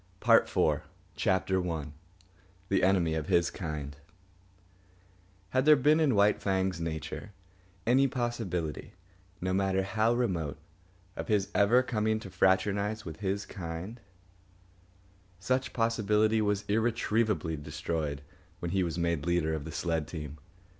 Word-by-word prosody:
PART - - +5
IV - - +3 0.3
CHAPTER 95 0 +1
I 75 -3 -4 0.8
THE 95 - +2
ENEMY 90 -4 +3
OF 80 -1 -2
HIS 85 -3 +2
KIND 75 -5 -5 1.5
Had 130 +5 +1
there 155 0 +8
been 150 +3 +4
in 145 -7 +3
White 100 +1 +3
Fang's 95 -3 0
nature 80 +5 -5 0.5
any 130 +4 +4
possibility, 115 - -3 0.5
no 95 +1 -1
matter 95 0 +1
how 110 +4 +1
remote, 90 -13 -1 0.6
of - - -5
his 100 -2 +1
ever 115 +6 +4
coming 110 -3 0
to 95 - -9
fraternise 100 +4 +1
with 80 -2 -7
his 100 +1 -2
kind, 90 +5 -7 1.4
such 130 +6 0
possibility 110 -2 +2
was 105 -1 0
irretrievably 110 -5 0
destroyed 75 0 -4 0.3
when 85 -1 -4
he 95 0 +1
was 85 -2 -2
made 85 -3 -1
leader 85 -2 +1
of 75 -2 -4
the 80 - -6
sled 80 -2 -1
team. 75 -2 -7
95 Hz, 130 wpm, -30 LUFS, 80-110 Hz, 1.5 s, there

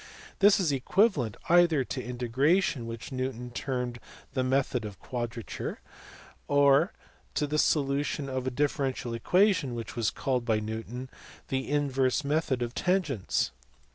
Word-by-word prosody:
This 205 +1 +6
is 175 -6 +2
equivalent 140 - +2
either 170 -5 +5
to 130 0 -5
integration 125 +4 +1
which 115 +2 -7
Newton 130 -2 -3
termed 125 -1 -3 0.3
the 130 -2 0
method 130 -1 +1
of 105 -2 -7
quadrature, 120 -2 -5 0.7
or 145 +4 +4 0.4
to 150 - +1
the 150 +1 0
solution 140 -1 +1
of 130 -1 -3
a - - +3
differential 135 -2 -1
equation 180 - +2
which 115 -2 -6
was 115 -3 +1
called 130 -3 -1
by 110 -3 +1
Newton 110 +4 -5 0.4
the 130 0 -2
inverse 135 -2 +1
method 140 -3 0
of 120 0 -4
tangents. 180 - 0
130 Hz, 135 wpm, -29 LUFS, 120-145 Hz, 0.7 s, This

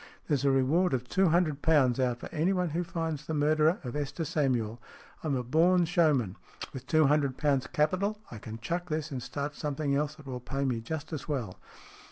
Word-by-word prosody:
There's 145 -4 +1
a 140 - +4
reward 135 +6 +3
of 125 -1 -4
two 190 +8 +3
hundred 155 -4 +2
pounds 135 -6 +3
out 125 -2 +1
for - - -8
anyone 180 +2 +1
who 170 +3 -1
finds 165 -4 -3
the 160 - -2
murderer 155 +3 +3
of 125 0 -5
Esther 150 +3 -3
Samuel. 120 -7 0 0.4
I'm 150 -4 0
a 125 - -1
born 170 +7 +4
showman. 150 - +2 0.4
With 130 0 -8
two 155 -1 +4
hundred 140 -2 +2
pounds 140 -4 +1
capital 185 +7 0
I 115 - -7
can 110 +1 -7
chuck 170 +9 -3
this 155 -1 -2
and 130 -2 -4
start 145 +3 -4
some 145 0 -3
thing 145 -1 -1
else 150 +1 -1
that 155 -2 -15
will 130 -2 -5
pay 135 +3 -3
me 120 -4 -1
just 155 +6 -5
as 150 -3 -5
well." 120 -11 -3
150 Hz, 210 wpm, -29 LUFS, 130-160 Hz, 0.4 s, a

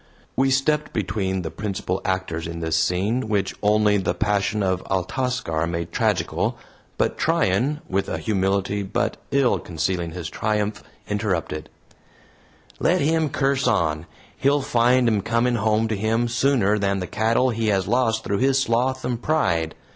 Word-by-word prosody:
We 135 +1 +3
stepped 150 +3 +1
between 95 -2 -1
the 80 - -4
principal 95 -2 -3
actors 95 -4 -2
in 85 0 -6
this 80 -1 -1
scene, 95 +9 +1
which 100 -3 0
only 105 0 +3
the 95 -3 -1
passion 105 0 0
of 95 -1 0
Altascar 95 -4 -1
made 85 0 -3
tragical, - - 0 0.4
but - - 0
Tryan, 125 +11 +1
with 95 +1 -1
a - - -2
humility 100 -1 0
but 95 - -1
ill 125 -8 +2
concealing 85 +1 -2
his 85 -3 -5
triumph, 105 -1 -1 0.3
interrupted: 100 -7 -2 1.1
"Let - - +2
him 160 +1 +2
curse 135 -1 +1
on. 85 -8 +1 0.3
He'll 140 +1 +2
find 120 +1 +3
'em 110 -3 +2
coming 115 +3 +1
home 110 +1 +1
to 110 - 0
him 110 +3 0
sooner 115 -4 +2
than 100 -1 0
the 90 - -3
cattle 115 +6 +1
he 115 -1 -1
has 95 -3 +1
lost 115 0 +1
through 100 0 -1
his 135 0 +3
sloth 130 +1 0
and 120 -2 -2
pride. 85 - 0
105 Hz, 155 wpm, -23 LUFS, 95-125 Hz, 1.1 s, We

